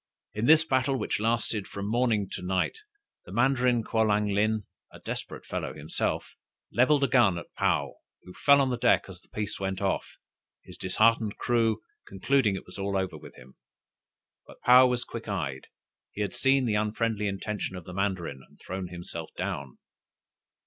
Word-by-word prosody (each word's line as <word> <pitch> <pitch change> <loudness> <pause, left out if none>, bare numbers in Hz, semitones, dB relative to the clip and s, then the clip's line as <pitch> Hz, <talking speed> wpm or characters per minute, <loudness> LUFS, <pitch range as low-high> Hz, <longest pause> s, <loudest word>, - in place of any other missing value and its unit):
In 110 +3 -1
this 160 0 +7
battle 130 -1 +1
which - - -2
lasted 110 -2 0
from 100 0 -5
morning 110 -3 +1
to - - -5
night, 95 - -1 0.5
the - - -11
Mandarin 125 +1 +2
Kwolang 105 -2 +1
lin, 110 0 +1 0.3
a - - -13
desperate - - -6
fellow - - -4
himself, - - -3 0.4
levelled 140 +4 +4
a - - +4
gun 120 -8 +4
at 85 - -9
Paou, - - +1 0.3
who 90 - -12
fell 140 +6 +5
on 135 -1 +1
the 120 - -2
deck - - +4
as 95 -2 -11
the - - -29
piece 105 0 -4
went 95 -1 -2
off; 100 -1 -2 0.5
his - - -12
disheartened 110 +3 +2
crew 115 -2 +1 0.3
concluded 105 +2 +1
it 95 - -7
was - - -11
all 100 0 -1
over 95 -3 -2
with 75 - -12
him. 65 +1 -16 0.9
But - - -14
Paou 125 +1 +8
was 125 -1 -1
quick 115 -1 -8
eyed. 75 -10 -3 0.4
He 105 - -6
had 100 -3 -2
seen 135 -1 +3
the 110 - 0
unfriendly 105 0 0
intention 100 0 -3
of 90 - -7
the 90 - -8
mandarin, 95 -7 -2
and - - -24
thrown 95 0 -5
himself 85 -2 -7
down. 70 -2 -4
105 Hz, 175 wpm, -28 LUFS, 95-120 Hz, 0.9 s, Paou